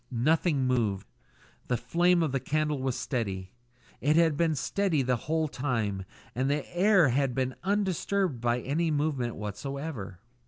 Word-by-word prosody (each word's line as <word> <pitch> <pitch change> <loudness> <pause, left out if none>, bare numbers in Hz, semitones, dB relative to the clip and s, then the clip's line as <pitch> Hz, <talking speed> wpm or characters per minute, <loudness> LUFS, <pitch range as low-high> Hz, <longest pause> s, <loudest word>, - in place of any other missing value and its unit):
Nothing 140 +3 +2
moved. 110 -7 0 0.6
The 125 - +1
flame 175 +5 +2
of 155 - 0
the 135 - 0
candle 150 0 -1
was 130 -2 -1
steady. 95 -8 -3 0.5
It 150 +3 +2
had 165 -2 +4
been 160 0 +1
steady 165 +1 0
the 125 0 +1
whole 160 0 +1
time, 115 -9 -2 0.3
and 130 +3 0
the 145 +1 -1
air 190 -4 +5
had 130 0 +1
been 130 -1 0
undisturbed 195 - 0
by 120 0 +1
any 160 +6 0
movement 145 -6 -1
whatsoever. 105 - -5
140 Hz, 150 wpm, -28 LUFS, 120-160 Hz, 0.6 s, air